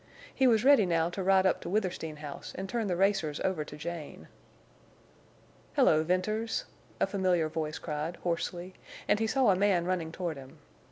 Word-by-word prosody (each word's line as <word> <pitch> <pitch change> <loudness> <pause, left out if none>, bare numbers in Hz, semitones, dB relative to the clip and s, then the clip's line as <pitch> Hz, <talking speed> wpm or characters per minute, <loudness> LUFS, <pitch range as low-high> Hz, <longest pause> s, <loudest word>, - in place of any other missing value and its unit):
He 265 - +3
was 225 -1 +3
ready 275 -8 +6
now 165 0 +1
to 190 - -4
ride 190 0 +4
up 190 - +2
to - - -6
Withersteen 185 -6 -2
House 150 -1 -8
and 190 - -4
turn 225 +1 -2
the 180 - 0
racers 190 -5 +1
over 185 -5 0
to 150 0 -10
Jane. 165 0 -7 1.5
"Hello, 155 - +5
Venters!" 215 +6 -1 0.3
a - - +4
familiar 185 -4 +1
voice 155 -1 -3
cried, 155 +2 -4
hoarsely, 175 +1 -3 0.3
and 210 - +3
he 225 - +1
saw 255 -1 +3
a - - +3
man 190 -3 +2
running 175 -3 -1
toward 170 -3 -4
him. 135 -1 -12
180 Hz, 175 wpm, -30 LUFS, 160-200 Hz, 1.5 s, ready